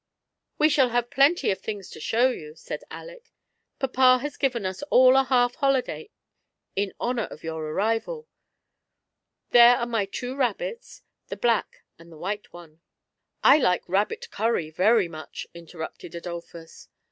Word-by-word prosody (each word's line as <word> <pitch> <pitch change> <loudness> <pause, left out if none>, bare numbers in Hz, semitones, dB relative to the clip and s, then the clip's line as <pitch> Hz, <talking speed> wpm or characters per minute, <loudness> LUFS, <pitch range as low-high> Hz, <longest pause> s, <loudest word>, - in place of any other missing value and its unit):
We 305 - +5
shall 270 -4 +3
have 240 0 -1
plenty 280 +2 +3
of 190 - -3
things 205 -4 -6
to - - -10
show 245 +3 +2
you," 155 -9 -9
said 165 - -7
Aleck; - - -11 0.5
"papa 255 -1 +4
has 295 0 -4
given 245 -7 -1
us 185 +6 -4
all 255 +1 +6
a 270 0 +4
half 245 -2 +2
holiday 275 - -1 0.7
in 200 0 -1
honour 240 -2 -1
of - - -12
your 160 -1 -4
arrival 225 - -2 1.2
There 240 0 +8
are 235 - -2
my 225 -4 -1
two 245 +6 -6
rabbits, 470 - -3 0.2
the - - -6
black 235 -2 0 0.2
and 170 0 -16
the 160 - -13
white 205 +5 -5
one." 165 -2 -14 0.3
" - - -53
I 285 +3 +7
like 180 -9 +1
rabbit 210 - -1
cuiTy 195 -9 -1
very 210 +2 +3
much," 155 -2 -8
interrupted 170 0 -9
Adolphus. 170 -1 -9
235 Hz, 155 wpm, -25 LUFS, 175-265 Hz, 1.2 s, There